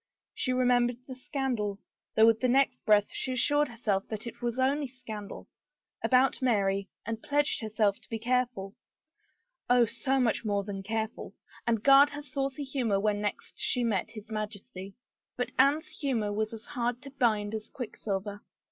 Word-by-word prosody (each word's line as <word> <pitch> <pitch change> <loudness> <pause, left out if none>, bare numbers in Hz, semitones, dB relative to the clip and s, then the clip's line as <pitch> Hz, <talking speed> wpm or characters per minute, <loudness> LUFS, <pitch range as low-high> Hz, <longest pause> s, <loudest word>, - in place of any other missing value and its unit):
She 255 - -1
remembered 245 -1 +3
the 260 - -7
scandal 250 -7 -2 0.2
— - - -64
though 220 - +7
with 225 -1 +5
the 255 - +2
next 260 0 +2
breath 210 -1 +4
she 260 - -2
assured 290 +4 +3
herself 215 -5 -1
that 215 0 -5
it 235 +1 -8
was 240 0 -2
only 275 +2 +2
scandal 230 -5 -8 0.3
— - - -34
about 260 +1 +3
Mary, 200 -5 +1 0.2
and 225 +1 -4
pledged 290 -2 +1
herself 215 -2 +1
to - - -19
be 225 - -2
careful 240 -4 -1 0.5
— - - -46
Oh, 245 -1 +6
so 265 +4 0
much 235 -3 +1
more 205 -2 0
than 195 -1 -5
careful! 220 +2 -4
— - - -22
and 230 -2 +1
guard 275 +1 +8
her 295 0 -7
saucy 275 +1 -3
humor 250 -7 0
when 205 0 +1
next 205 -1 -4
she 250 - +1
met 210 -6 0
his 215 0 -11
Majesty. 205 -3 -6 0.4
But 245 - -2
Anne's 280 +4 +4
humor 230 -8 -1
was 215 +1 -1
as 225 0 -9
hard 245 -3 -2
to 275 - -9
bind 220 -6 +1
as 215 -1 -5
quicksilver. 205 -4 -4
235 Hz, 180 wpm, -29 LUFS, 210-260 Hz, 0.5 s, guard